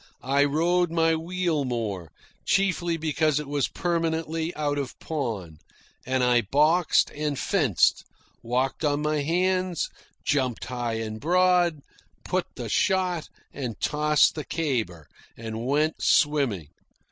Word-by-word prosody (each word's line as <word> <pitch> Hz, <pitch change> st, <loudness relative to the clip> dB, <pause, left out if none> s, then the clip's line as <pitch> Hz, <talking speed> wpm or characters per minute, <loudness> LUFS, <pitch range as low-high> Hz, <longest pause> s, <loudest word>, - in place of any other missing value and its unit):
I 140 Hz, +2 st, +3 dB
rode 170 Hz, +4 st, +2 dB
my 165 Hz, 0 st, +2 dB
wheel 170 Hz, -2 st, -1 dB
more, 105 Hz, -, -3 dB, 0.3 s
chiefly 180 Hz, -3 st, +1 dB
because 155 Hz, -1 st, +1 dB
it 150 Hz, -, -6 dB
was 145 Hz, -1 st, 0 dB
permanently 165 Hz, -1 st, -1 dB
out 145 Hz, -1 st, -1 dB
of 135 Hz, -3 st, -5 dB
pawn; 110 Hz, -, -4 dB, 0.5 s
and 130 Hz, 0 st, +1 dB
I 125 Hz, -1 st, +4 dB
boxed 155 Hz, -, +3 dB
and 150 Hz, -1 st, -3 dB
fenced, 145 Hz, -, +2 dB, 0.4 s
walked 130 Hz, +5 st, -1 dB
on 145 Hz, 0 st, +1 dB
my 150 Hz, -1 st, 0 dB
hands, 185 Hz, +2 st, 0 dB, 0.3 s
jumped 130 Hz, -5 st, 0 dB
high 120 Hz, -2 st, -3 dB
and 110 Hz, -1 st, -4 dB
broad, 175 Hz, -1 st, +3 dB, 0.4 s
put -, -, -1 dB
the -, -, -5 dB
shot 185 Hz, -4 st, +1 dB, 0.2 s
and 125 Hz, -5 st, -5 dB
tossed 150 Hz, 0 st, +3 dB
the 155 Hz, -, -5 dB
caber, 115 Hz, -, -2 dB, 0.3 s
and 115 Hz, +1 st, -5 dB
went 150 Hz, +3 st, +1 dB
swimming. 135 Hz, -, +2 dB
150 Hz, 125 wpm, -26 LUFS, 125-165 Hz, 0.5 s, I